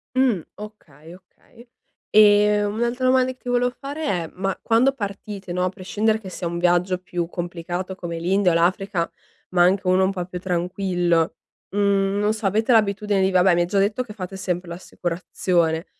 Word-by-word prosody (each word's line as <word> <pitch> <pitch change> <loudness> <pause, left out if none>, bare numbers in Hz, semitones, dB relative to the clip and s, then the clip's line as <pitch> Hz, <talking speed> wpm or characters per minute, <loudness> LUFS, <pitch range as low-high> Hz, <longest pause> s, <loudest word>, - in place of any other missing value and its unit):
Mh, 255 -8 +2
okay, 170 -7 -12
okay 230 +6 -20 0.4
e 210 0 +5
un'altra 235 +5 -1
domanda 255 0 +3
che - - -29
ti 250 - -8
volevo 245 0 +2
fare 285 +4 -5
è: 175 - -1
ma 195 +1 -2
quando 245 +4 +3
partite 200 -4 -6
no, 180 +1 0
a - - +1
prescindere 210 +4 -1
che 190 - -8
sia 180 -1 -5
un 170 0 -4
viaggio 175 +1 +2
più 175 -2 -4
complicato 175 +2 -5
come 170 -2 -6
l'India 185 +2 +2
o - - +1
l'Africa, 180 +1 0 0.4
ma 175 -1 +3
anche 190 +2 +2
uno 185 +1 +4
un 190 - 0
po' 180 -2 -4
più 180 0 -7
tranquillo, 175 -2 0 0.3
mhmm, 200 -1 +1
non 210 +1 +2
so 220 -1 -6
avete 220 +5 +1
l'abitudine 210 -2 +2
di 190 - +3
vabbè 185 0 +4
mi 175 - +2
hai - - +2
già 200 - -1
detto 205 +5 +1
che 220 -4 -11
fate 190 -1 -7
sempre 180 -2 -3
l'assicurazione, 170 -1 -2
190 Hz, 185 wpm, -22 LUFS, 175-210 Hz, 0.4 s, e